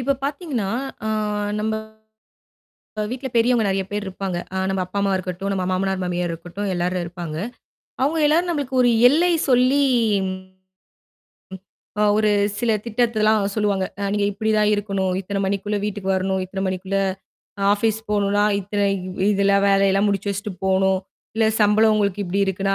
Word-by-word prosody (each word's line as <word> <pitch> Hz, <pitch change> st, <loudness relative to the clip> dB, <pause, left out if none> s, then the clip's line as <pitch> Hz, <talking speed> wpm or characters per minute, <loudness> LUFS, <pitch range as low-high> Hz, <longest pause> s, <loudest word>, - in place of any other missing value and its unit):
இப்ப 275 Hz, +3 st, +1 dB
பார்த்தீங்கன்னா, 280 Hz, -, -2 dB, 0.4 s
அ -, -, -1 dB, 0.5 s
நம்ப 220 Hz, 0 st, -1 dB, 1.3 s
அ -, -, +1 dB
வீட்ல 260 Hz, +2 st, -4 dB
பெரியவங்க 235 Hz, 0 st, +3 dB
நெறைய 195 Hz, 0 st, 0 dB
பேர் 205 Hz, 0 st, -3 dB
இருப்பாங்க. 190 Hz, -1 st, -4 dB, 0.2 s
அ -, -, -2 dB
நம்ம 190 Hz, -1 st, -1 dB
அப்பா, 185 Hz, +3 st, -7 dB
அம்மா 200 Hz, 0 st, +1 dB
இருக்கட்டும், 185 Hz, +2 st, -4 dB
நம்ம 185 Hz, -1 st, -1 dB
மாமனார், 190 Hz, +1 st, 0 dB
மாமியார் 175 Hz, -1 st, -2 dB
இருக்கட்டும் 175 Hz, +5 st, -5 dB
எல்லாரும் 180 Hz, +1 st, -1 dB
இருப்பாங்க. 170 Hz, -2 st, -6 dB, 0.7 s
அவங்க 315 Hz, +3 st, +1 dB
எல்லாரும் 335 Hz, +4 st, +2 dB
நம்மளுக்கு 280 Hz, -4 st, -3 dB
ஒரு 245 Hz, -, +4 dB, 0.2 s
எல்லை 340 Hz, +6 st, +3 dB, 0.2 s
சொல்லி, 255 Hz, +2 st, +4 dB, 2.2 s
அ -, -, +4 dB
ஒரு 215 Hz, 0 st, +3 dB, 0.3 s
சில 235 Hz, 0 st, +1 dB, 0.2 s
திட்டத்தில்லாம் 220 Hz, -2 st, +2 dB
சொல்லுவாங்க. 205 Hz, -3 st, +1 dB, 0.2 s
அ -, -, -3 dB
நீங்க 205 Hz, -1 st, +1 dB
இப்படிதான் 215 Hz, 0 st, +1 dB
இருக்கணும். 195 Hz, -2 st, -1 dB
இத்தன 195 Hz, +1 st, -3 dB
மணிக்குள்ள 200 Hz, +2 st, -1 dB
வீட்டுக்கு 205 Hz, -2 st, -3 dB
வரணும். 190 Hz, 0 st, -1 dB
இத்தன 190 Hz, +1 st, -5 dB
மணிக்குள்ள 190 Hz, +1 st, -2 dB, 0.7 s
ஆஃபீஸ் 220 Hz, +1 st, 0 dB
போணும்னா, 205 Hz, 0 st, +2 dB, 0.2 s
இத்தன 205 Hz, +1 st, -2 dB, 0.5 s
இதெல்லாம் 200 Hz, 0 st, +3 dB
வேலையெல்லாம் 195 Hz, +1 st, +3 dB
முடிச்சு 200 Hz, 0 st, -1 dB
வச்சுட்டு 200 Hz, +1 st, -4 dB
போணும். 190 Hz, 0 st, +2 dB, 0.4 s
இல்ல 225 Hz, -1 st, +3 dB
சம்பளம் 215 Hz, +1 st, +4 dB
உங்களுக்கு 205 Hz, -1 st, 0 dB
இப்படி 190 Hz, +2 st, -1 dB
இருக்குன்னா, 195 Hz, +1 st, 0 dB
200 Hz, 145 wpm, -22 LUFS, 190-220 Hz, 2.2 s, ஒரு